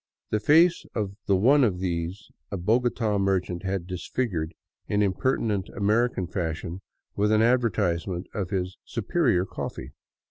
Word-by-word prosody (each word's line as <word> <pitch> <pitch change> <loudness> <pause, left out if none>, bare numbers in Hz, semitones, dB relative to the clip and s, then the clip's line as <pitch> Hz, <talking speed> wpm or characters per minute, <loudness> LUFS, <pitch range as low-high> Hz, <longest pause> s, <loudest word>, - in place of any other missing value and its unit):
The 110 - +2
face 165 +9 +5
of 105 -3 -2
the 100 - +4
one 135 +9 +5
of 100 -7 +2
these 90 +2 -3 0.2
a 100 - -3
Bogota 110 +1 +1
merchant 95 -3 0
had 95 -2 -2
disfigured 90 -2 -3 0.3
in 105 0 +2
impertinent 105 0 0
American 105 0 +1
fashion 85 0 -4 0.3
with 105 +1 +2
an 110 0 +4
advertisement 95 -7 +1
of 95 -4 -3
his 95 -2 -2
'' - - -68
superior 115 - +2
coffee." - - -6
100 Hz, 140 wpm, -26 LUFS, 90-115 Hz, 0.3 s, face